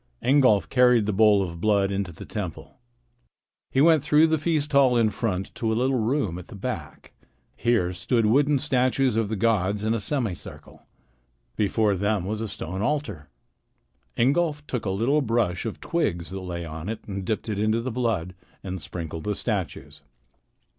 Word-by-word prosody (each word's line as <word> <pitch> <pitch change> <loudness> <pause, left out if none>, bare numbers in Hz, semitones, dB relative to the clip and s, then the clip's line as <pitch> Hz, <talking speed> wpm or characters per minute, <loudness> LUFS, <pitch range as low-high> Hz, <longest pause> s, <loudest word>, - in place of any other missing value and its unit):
Ingolf 130 -6 +4
carried 125 -4 +4
the 105 - -1
bowl 105 -1 +5
of 85 -2 -7
blood 100 -2 +2
into 100 -2 -2
the 80 - -10
temple. 100 -7 -6 0.9
He 135 - +2
went 160 -1 +5
through 150 +2 +4
the 160 -1 +1
feast 150 -1 0
hall 135 -3 +4
in 110 -2 +3
front 95 -3 -3
to 110 -1 -2
a 110 - 0
little 130 +1 +1
room 110 - -1
at 90 - -11
the - - -11
back. 95 - -6 0.4
Here 110 -7 +1
stood 115 +6 0
wooden 140 +6 +3
statues 130 -2 +1
of 110 -2 0
the 110 - -1
gods 105 -1 +1
in 110 - +1
a 115 - 0
semicircle. 105 - -4 0.7
Before 105 0 +1
them 100 0 0
was 105 +2 -3
a 110 - -2
stone 95 -1 -5
altar. 110 - -2 0.9
Ingolf 150 +4 +1
took 125 -6 -4
a - - 0
little 120 +10 +1
brush 115 -6 0
of 110 - -6
twigs 85 - -2
that 95 - -5
lay 85 -2 -5
on 80 +3 -6
it 110 0 -6
and 100 -1 -4
dipped 110 +4 -3
it 105 -2 -2
into 110 +2 +1
the 125 +2 -3
blood 110 -8 -1 0.3
and 95 -2 -5
sprinkled 80 -2 -6
the 105 -1 -1
statues. 100 -7 -4
110 Hz, 175 wpm, -25 LUFS, 95-125 Hz, 0.9 s, bowl